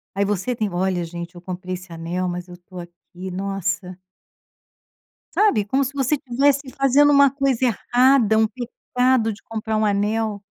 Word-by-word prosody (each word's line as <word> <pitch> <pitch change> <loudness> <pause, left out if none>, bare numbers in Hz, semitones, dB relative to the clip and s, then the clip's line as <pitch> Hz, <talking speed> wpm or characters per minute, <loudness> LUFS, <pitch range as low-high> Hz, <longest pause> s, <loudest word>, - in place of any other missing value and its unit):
aí 200 +1 +1
você 205 +5 -1
tem: 215 -2 -1
"Olha, 180 -1 0
gente 170 +1 -7
eu 175 - -11
comprei 185 0 -6
esse 180 -1 -12
anel, 170 +3 -3
mas 180 0 -5
eu 175 0 -11
tô 180 +1 -12
aqui, 175 +1 -10
nossa". 190 -1 -3 1.4
Sabe, 325 - +3
como 265 +7 +1
se 275 +1 -4
você 280 +1 0
tivesse 275 +2 +1 0.2
fazendo 275 +2 +4
uma 280 -1 +6
coisa 275 -3 0
errada, 245 -1 +3
um 220 0 +4
pecado 250 -1 -1
de 205 - -15
comprar 220 -1 -3
um 215 - +1
anel. 210 +1 0
210 Hz, 165 wpm, -22 LUFS, 185-255 Hz, 1.4 s, uma